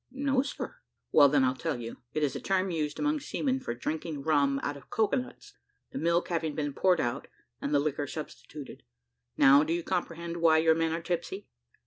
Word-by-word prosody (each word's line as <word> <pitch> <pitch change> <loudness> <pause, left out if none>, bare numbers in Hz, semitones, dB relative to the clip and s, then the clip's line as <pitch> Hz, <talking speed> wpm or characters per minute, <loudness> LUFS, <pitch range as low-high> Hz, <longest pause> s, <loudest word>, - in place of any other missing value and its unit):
"No, 270 0 +1
sir." 285 - -6 0.3
"Well, 145 -2 +7
then, 140 -1 +3
I'll 130 0 +3
tell 145 0 -3
you; 115 -1 -7 0.2
it 155 - +1
is 145 - 0
a - - -3
term 190 -1 0
used, 150 -3 -2
among 300 +1 +1
seamen 265 -1 -1
for 120 - -4
drinking 155 +2 -4
rum 140 -3 +2
out 145 - -2
of 140 - -14
cocoa 220 +4 +1
nuts, 255 - -7 0.4
the 270 - -4
milk 170 -3 +1
having 160 -3 -1
been 145 -2 -2
poured 180 +3 +3
out, 120 +1 -2 0.3
and 140 - -2
the 145 - +4
liquor 145 0 -1
substituted. 150 -1 -8 0.6
Now 140 +2 +7
do 160 +2 -1
you 170 0 -1
comprehend 170 -1 -3
why 165 -1 +5
your 160 0 +5
men 165 0 0
are 165 +1 -3
tipsy?" 180 +3 -3
160 Hz, 200 wpm, -29 LUFS, 145-180 Hz, 0.6 s, Well